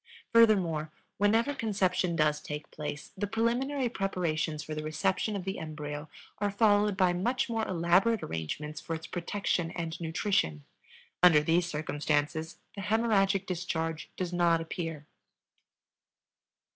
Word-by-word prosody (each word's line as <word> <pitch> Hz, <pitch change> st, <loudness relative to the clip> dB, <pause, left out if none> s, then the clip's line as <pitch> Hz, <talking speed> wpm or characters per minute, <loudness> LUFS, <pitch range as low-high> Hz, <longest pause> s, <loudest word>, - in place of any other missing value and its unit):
Furthermore, 180 Hz, -9 st, +4 dB, 0.3 s
whenever 225 Hz, +7 st, +3 dB
conception 190 Hz, -7 st, 0 dB
does 150 Hz, -2 st, +2 dB
take 150 Hz, 0 st, -6 dB
place, 150 Hz, -1 st, -6 dB
the 205 Hz, +2 st, -2 dB
preliminary 245 Hz, +5 st, 0 dB
preparations 170 Hz, -7 st, -1 dB
for 155 Hz, -, -6 dB
the 155 Hz, -, -3 dB
reception 185 Hz, +7 st, 0 dB
of 195 Hz, -, -3 dB
the 190 Hz, +1 st, -3 dB
embryo 150 Hz, -1 st, -6 dB, 0.3 s
are 205 Hz, 0 st, +1 dB
followed 205 Hz, -1 st, +3 dB
by 185 Hz, -2 st, +4 dB
much 245 Hz, +9 st, 0 dB
more 225 Hz, -2 st, -1 dB
elaborate 185 Hz, +6 st, +3 dB
arrangements 145 Hz, -, -4 dB
for 165 Hz, -, -3 dB
its 160 Hz, 0 st, -7 dB
protection 175 Hz, -1 st, -1 dB
and 170 Hz, 0 st, -5 dB
nutrition. 160 Hz, -, 0 dB, 0.6 s
Under 170 Hz, -4 st, +7 dB
these 170 Hz, +2 st, +2 dB
circumstances 150 Hz, 0 st, -1 dB, 0.2 s
the 200 Hz, -, -5 dB
hemorrhagic 205 Hz, -2 st, +2 dB
discharge 165 Hz, -3 st, -3 dB
does 180 Hz, -1 st, -3 dB
not 170 Hz, -1 st, +3 dB
appear. 165 Hz, -2 st, -5 dB
175 Hz, 130 wpm, -30 LUFS, 155-205 Hz, 0.6 s, Under